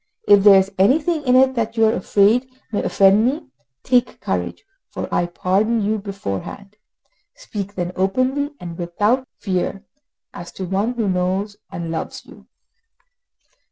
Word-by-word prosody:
If 205 -1 +6
there 200 -1 +8
is 190 +1 -1
anything 300 - +3
in 250 - +4
it 265 0 +5
that 230 -1 -3
you 225 - +5
are 220 - +3
afraid 210 +7 +2 0.2
may 205 - -1
offend 195 +2 +4
me, 260 +5 -1 0.4
take 250 -1 +1
courage, - - -3 0.2
for - - -5
I 175 - +1
pardon 200 +6 0
you 215 +1 0
beforehand. 200 - -6 0.6
Speak 205 - -7
then 175 -1 -3
openly 255 +10 0
and 170 -1 -8
without 210 +9 0
fear, 195 +1 -3 0.5
as 175 0 -9
to 190 - -5
one 195 +6 -1
who 225 -3 -1
knows 190 +3 -1
and 170 -1 -5
loves 160 - -5
you." - - -16
205 Hz, 150 wpm, -20 LUFS, 190-240 Hz, 0.6 s, there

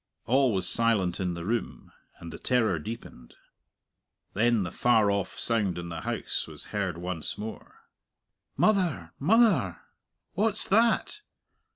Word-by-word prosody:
All 130 +1 +3
was 95 -3 0
silent 105 -7 +2
in 90 -2 -2
the 85 0 -6
room, 115 +3 -3 0.3
and 85 -1 -9
the - - -9
terror 115 -9 +1
deepened. 105 - -9 1.0
Then 115 0 +2
the 85 - -5
far 110 -4 +3
off 100 -2 -2
sound 105 -6 +1
in 85 0 -6
the 85 - -6
house - - -3
was - - -11
heard 95 -5 -2
once 85 -2 -4
more. 110 +2 -9 0.8
"Mother 175 - +1
mother, 170 - +3 0.5
what's 215 +1 +2
that?" 230 - +2
110 Hz, 135 wpm, -27 LUFS, 90-130 Hz, 1.0 s, All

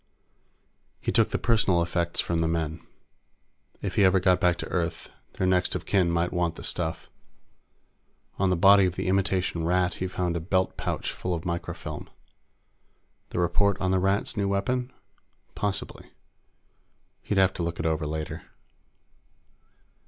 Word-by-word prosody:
He - - -2
took - - +3
the - - -1
personal 95 -7 +2
effects 85 0 -1
from 85 -1 +1
the 80 - +1
men. 80 -1 -2 1.0
If - - -3
he 100 - +5
ever 95 0 +5
got 90 -1 +3
back 90 -1 +3
to - - -5
Earth, 85 -2 -2 0.2
their - - -1
next 90 -1 +2
of - - -4
kin 95 -4 +2
might 85 +1 0
want 85 -2 0
the - - -9
stuff. 80 -2 -3 1.3
On 95 -1 +3
the 90 - +3
body 100 +2 +6
of 90 - -4
the - - -3
imitation 95 -3 0
Rat, 90 +1 +2
he 95 - 0
found 90 -1 -2
a - - 0
belt 95 +3 0
pouch - - -3
full 90 -1 -3
of 80 - -6
microfilm. 85 -2 -5 1.2
The - - -6
report 90 +3 +2
on 95 -1 0
the 95 - +3
Rats' 95 +2 0
new 100 -1 0
weapon? 125 +6 -1 0.6
Possibly. 100 -2 -3 1.1
He'd 105 - -2
have 95 0 +4
to - - -5
look 85 0 -3
it 80 - -2
over 80 -1 0
later. 75 0 -4
90 Hz, 160 wpm, -27 LUFS, 85-95 Hz, 1.3 s, body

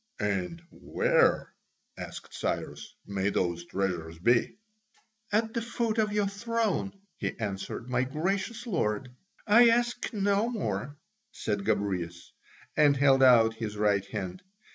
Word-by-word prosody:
"And 105 - -2
where," - - +1 0.4
asked - - -9
Cyrus, - - -4
"may 100 0 -1
those 85 -3 -1
treasures 85 -4 -3
be?" 120 - +2 0.7
"At 220 +2 +1
the 230 - -1
foot 230 -1 -1
of 215 -1 +2
your 205 -1 +1
throne," 205 -1 -2 0.2
he - - -3
answered, 105 +2 -4
"my 125 0 +1
gracious 190 - -2
lord." 130 - -1 0.4
"I 230 +3 +7
ask 240 +1 +1
no 205 +1 +1
more," 150 - -3 0.3
said 105 -2 -3
Gobryas, 95 -5 -2 0.4
and 145 -2 +5
held 135 -1 +4
out 115 -4 +6
his 110 -2 -5
right 105 -2 +2
hand. 95 -4 -5
130 Hz, 125 wpm, -29 LUFS, -, 0.7 s, I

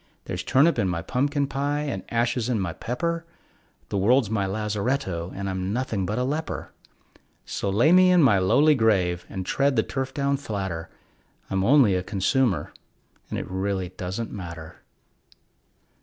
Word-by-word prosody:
There's 90 - -4
turnip 140 - +3
in 100 - +2
my 85 -2 -2
pumpkin 140 - 0
pie 145 +2 -1
and 150 -2 -3
ashes 120 0 0
in 120 -4 +1
my 90 -4 -2
pepper, 165 - -3 0.7
The 100 - -1
world's 115 +2 +3
my 100 -3 0
lazaretto, 105 -3 -2
and 100 0 -4
I'm 95 0 -2
nothing 110 -5 -2
but 105 - -2
a 125 - +1
leper; 150 +5 -3 0.7
So 100 - -3
lay 115 +11 +4
me 185 0 +7
in 180 -3 +5
my 105 -8 +5
lonely 145 +12 +4
grave 95 - +1
and 95 -1 -5
tread 140 +5 +1
the 110 - +3
turf 135 -1 -3
down 140 0 0
flatter, 95 -10 -4 0.6
I'm 95 0 +1
only 125 -2 +5
a 90 - +1
consumer, 100 +4 0 0.6
and - - -3
it - - -3
really 95 -1 -2
doesn't 95 +5 -5
matter. 85 -5 -8
110 Hz, 160 wpm, -25 LUFS, 95-135 Hz, 0.7 s, me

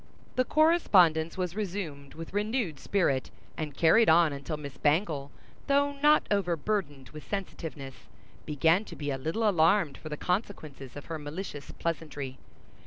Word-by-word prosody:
The 255 - +2
correspondence 190 - +4
was 180 -1 -2
resumed 175 -9 -5
with 165 +2 -8
renewed 205 - -1
spirit, 140 -10 0 0.3
and 150 -3 -5
carried 220 +8 +5
on 160 -2 +5
until 140 +2 -5
Miss 140 -2 -8
Bangle, 150 -2 +1 0.4
though 285 0 +3
not 300 +1 +5
overburdened 175 -6 -1
with 150 0 -11
sensitiveness, 160 - -6 0.4
began 160 +6 +3
to - - -10
be 145 -1 -3
a 135 - -3
little 165 - 0
alarmed 170 -3 +3
for 155 - -8
the 150 - -4
consequences 155 - -4
of 145 - -8
her 160 -1 -5
malicious 150 0 -7
pleasantry. 145 -5 -4
165 Hz, 145 wpm, -29 LUFS, 145-200 Hz, 0.4 s, carried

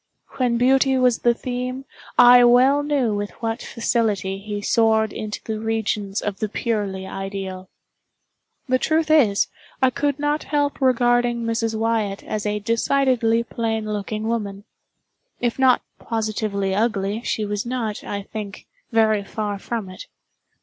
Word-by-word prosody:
When 245 -2 +1
beauty 265 +2 +3
was 250 -2 +3
the 240 -1 +3
theme, 255 +2 -4 0.3
I 245 0 +8
well 255 +4 +5
knew 285 -6 0
with 205 0 -2
what 225 0 -4
facility 210 -5 -1
he 205 +1 -5
soared 220 0 +2
into 215 -1 -5
the 220 -1 -4
regions 215 -2 -2
of 205 -2 -3
the 215 - -2
purely 205 -4 -2
ideal. 190 -1 -6 1.0
The 255 0 +2
truth 315 +1 +1
is, 230 -11 +4 0.3
I 260 -1 +3
could 285 +2 -1
not 295 +1 -1
help 290 -1 -1
regarding 245 -2 +2
Mrs. 230 -1 -1
Wyatt 220 -3 -1
as 210 -1 -3
a 210 0 0
decidedly 230 +1 +1
plain 225 -2 -2
looking 215 +1 -3
woman. 205 -3 -3 0.8
If 240 +1 -1
not 260 -2 +4 0.2
positively 215 -3 -2
ugly, 210 0 0
she 220 -3 -2
was 205 0 -2
not, 235 -4 -3
I 200 -1 -4
think, 205 -1 -7 0.3
very 220 -2 +3
far 205 0 -4
from 225 -1 -4
it. 185 0 -10
225 Hz, 145 wpm, -22 LUFS, 205-245 Hz, 1.0 s, I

